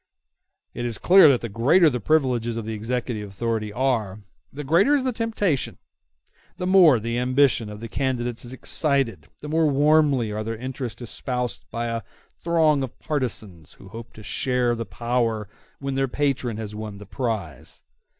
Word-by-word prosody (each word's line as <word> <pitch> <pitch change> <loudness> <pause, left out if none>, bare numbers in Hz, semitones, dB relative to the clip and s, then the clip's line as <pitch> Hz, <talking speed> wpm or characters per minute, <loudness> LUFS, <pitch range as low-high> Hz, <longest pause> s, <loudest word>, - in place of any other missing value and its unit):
It 120 - -5
is 120 -3 -2
clear 185 - +7
that 130 -3 +3
the 115 - -3
greater 130 - +4
the 125 -5 +1
privileges 120 -4 +1
of 115 - -4
the 110 - -4
executive 110 -1 -3
authority 110 +1 -2
are, 110 -5 -1 0.3
the 150 +2 -7
greater 175 - +4
is 275 - +1
the 260 - 0
temptation; 210 - -1 0.8
the 180 - -3
more 180 -9 +6
the 115 +2 -2
ambition 125 -3 +2
of 105 0 -9
the 115 - -5
candidates 125 -1 -2
is 120 - -8
excited, 135 -1 0
the 150 - -7
more 160 +1 +2
warmly 145 -5 +3
are 105 +1 -3
their 115 +1 -4
interests 130 0 -6
espoused 125 +1 -4
by 115 +1 -3
a 115 0 -2 0.4
throng 160 -4 +3
of 130 -3 -5
partisans 110 - -4
who 95 - -15
hope 115 +3 -9
to 110 - -12
share 125 +1 0
the 115 -2 -4
power 115 +1 -1 0.3
when 140 -1 -4
their 135 0 +1
patron 130 -4 -1
has 110 -2 -6
won 105 -1 -6
the 105 - -11
prize. 100 - -4
125 Hz, 170 wpm, -24 LUFS, 110-140 Hz, 0.8 s, clear